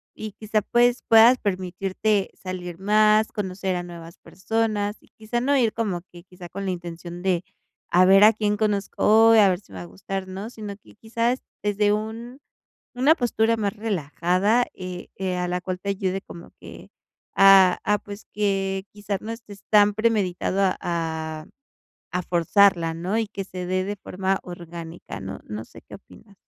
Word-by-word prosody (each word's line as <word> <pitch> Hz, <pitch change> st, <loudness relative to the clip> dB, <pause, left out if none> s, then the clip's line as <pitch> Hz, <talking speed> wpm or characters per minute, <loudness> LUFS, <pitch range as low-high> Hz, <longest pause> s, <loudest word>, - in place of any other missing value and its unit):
y 215 Hz, -2 st, -7 dB
quizá, 215 Hz, 0 st, -1 dB
pues, 240 Hz, +3 st, +2 dB
puedas 230 Hz, +3 st, +7 dB
permitirte 190 Hz, +2 st, -1 dB
salir 180 Hz, -2 st, -7 dB
más, 215 Hz, +2 st, +3 dB
conocer 190 Hz, -2 st, -3 dB
a 175 Hz, -, -2 dB
nuevas 170 Hz, -1 st, -11 dB
personas 215 Hz, 0 st, -2 dB
y -, -, -24 dB
quizá 220 Hz, +2 st, -4 dB
no 280 Hz, +2 st, +2 dB
ir 230 Hz, -4 st, +2 dB
como 200 Hz, -6 st, -2 dB
que 175 Hz, -1 st, -13 dB
quizá 180 Hz, -1 st, -12 dB
con 195 Hz, +1 st, -6 dB
la 190 Hz, -, -1 dB
intención 175 Hz, 0 st, -7 dB
de: 180 Hz, -2 st, +1 dB, 0.5 s
"A 180 Hz, +1 st, +5 dB
ver 195 Hz, +2 st, +7 dB
a 215 Hz, -, +9 dB
quién 210 Hz, -1 st, 0 dB
conozco, 215 Hz, +1 st, +3 dB
a 210 Hz, -3 st, +6 dB
ver 180 Hz, 0 st, 0 dB
si 200 Hz, -, -24 dB
me 95 Hz, -, -9 dB
va 90 Hz, -, -6 dB
a -, -, -9 dB
gustar", 185 Hz, -, -6 dB
¿no?, 195 Hz, +4 st, -6 dB
sino 210 Hz, -4 st, -7 dB
que 210 Hz, -, -20 dB
quizás 230 Hz, +3 st, -1 dB, 0.2 s
desde 205 Hz, 0 st, +2 dB
un 225 Hz, +4 st, -5 dB, 0.6 s
una 270 Hz, +5 st, +5 dB
postura 230 Hz, -4 st, +1 dB
más 205 Hz, -1 st, -1 dB
relajada, 200 Hz, +2 st, 0 dB
eh 180 Hz, -1 st, -8 dB
eh, 185 Hz, -1 st, -2 dB
a 180 Hz, 0 st, -1 dB
la 180 Hz, 0 st, -2 dB
cual 185 Hz, 0 st, -4 dB
te 200 Hz, -, -5 dB
ayude 195 Hz, -1 st, -2 dB
como 170 Hz, -, -12 dB
que -, -, -12 dB, 0.5 s
a 195 Hz, -2 st, +7 dB
a, 210 Hz, 0 st, +2 dB
pues, 205 Hz, +1 st, -10 dB
que 195 Hz, -2 st, -1 dB
quizás 205 Hz, -2 st, -4 dB
no 225 Hz, -, -6 dB
estés 210 Hz, -3 st, -10 dB
tan 210 Hz, -1 st, +5 dB
premeditado 200 Hz, -4 st, 0 dB
a 190 Hz, -2 st, +2 dB
a 160 Hz, -2 st, -3 dB, 0.6 s
a 180 Hz, +1 st, -1 dB
forzarla, 170 Hz, -1 st, +3 dB
¿no? 185 Hz, +7 st, -1 dB
Y 225 Hz, -, -1 dB
que 200 Hz, -1 st, -6 dB
se 180 Hz, -1 st, -7 dB
dé 185 Hz, 0 st, 0 dB
de 205 Hz, +2 st, -4 dB
forma 190 Hz, +1 st, -2 dB
orgánica, 170 Hz, -1 st, -9 dB
¿no? 95 Hz, 0 st, -7 dB
¿No 105 Hz, +1 st, -6 dB
sé -, -, -15 dB
qué -, -, -16 dB
opinas? 200 Hz, 0 st, -18 dB
195 Hz, 180 wpm, -24 LUFS, 180-215 Hz, 0.6 s, a